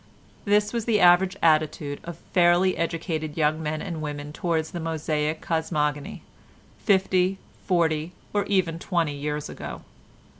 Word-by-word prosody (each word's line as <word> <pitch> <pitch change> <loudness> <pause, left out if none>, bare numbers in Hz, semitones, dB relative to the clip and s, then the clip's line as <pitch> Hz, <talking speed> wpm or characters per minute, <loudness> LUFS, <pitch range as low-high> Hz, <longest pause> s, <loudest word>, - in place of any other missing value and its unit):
This 210 +1 +2
was 230 -2 -2
the 220 -3 +2
average 185 +2 +5
attitude 155 -2 +2
of 170 -1 -7 0.2
fairly 180 +1 +4
educated 165 -2 -3
young 155 0 +1
men 155 0 -3
and 170 -5 -5
women 145 -1 -5
towards 160 -2 -1
the 175 - -5
Mosaic 155 -1 -2
cosmogony 150 -3 -2 0.6
fifty, 190 -2 +2 0.3
forty, 165 -2 +1 0.2
or 205 -1 +2
even 180 -5 0
twenty 170 -5 0
years 150 +1 -3
ago. - - -8
165 Hz, 135 wpm, -25 LUFS, 155-180 Hz, 0.6 s, average